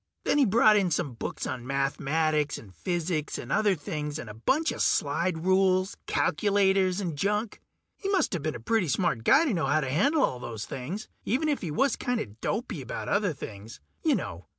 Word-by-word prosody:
Then 295 - +2
he 280 - +6
brought 215 0 +5
in 195 -3 +2
some 155 -4 -1
books 115 - -5
on 125 -1 -5
mathematics 145 +2 0
and 100 -4 -13
physics 170 - -2
and 120 - -7
other 205 -3 +3
things, 150 -1 -4
and 120 -9 -7
a - - -9
bunch 270 - +1
of - - -4
slide 170 -1 +1
rules, 185 0 +3
calculators, 190 0 +2
and 175 -6 -3
junk. 210 +7 -1 0.4
He 395 - -4
musta 355 - +1
been 155 +1 -3
a - - -6
pretty 195 - +1
smart 140 -5 0
guy 285 - +5
to 275 - +1
know 165 -6 0
how 155 +3 +2
to 135 - -2
handle 280 - +3
all 125 - 0
those 115 -3 -6
things, 150 +12 -5 0.2
even 270 +8 0
if 295 -2 0
he 175 - -3
was 270 - +1
kinda 245 -3 -1
dopey 155 - -4
about 125 - -5
other 200 -2 +2
things. 110 - -9 0.2
You - - +3
know 85 -2 -5
175 Hz, 195 wpm, -28 LUFS, 135-210 Hz, 0.4 s, he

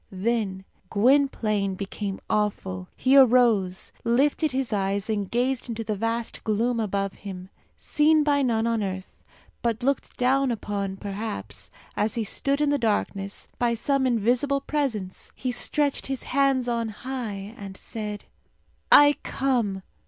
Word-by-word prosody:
Then 195 -1 -1 0.2
Gwynplaine 215 -4 +2
became 200 0 -4
awful. 190 -3 -1
He 260 +2 +3
arose, 235 -8 +4
lifted 280 +6 +2
his 260 -3 -1
eyes, 200 +1 0
and 205 -3 -2
gazed 250 +1 0
into 225 -1 -3
the 215 -1 -2
vast 230 +2 -2
gloom 230 +2 +1
above 200 -2 -1
him. 190 -1 -8 0.3
Seen 305 +1 +3
by 290 -1 +2
none 230 -4 +1
on 230 -1 +1
earth, 190 -1 -5 0.4
but 235 0 -1
looked 275 +2 -1
down 265 +2 +2
upon, 200 -4 -3
perhaps, 195 - -5 0.3
as 210 +3 0
he 230 - 0
stood 275 +7 0
in 295 -1 +3
the 290 - +1
darkness, 205 -3 -1
by 235 -1 +2
some 275 +3 +1
invisible 250 +4 +1
presence, 245 -11 -3
he 255 - -2
stretched 285 +3 0
his 270 -1 -3
hands 270 -2 +2
on 230 -2 -1
high, 215 -3 -5
and 195 -3 -9
said, 210 -2 -5 0.7
"I 290 0 +8
come!" 230 -8 -1
230 Hz, 140 wpm, -25 LUFS, 200-260 Hz, 0.7 s, I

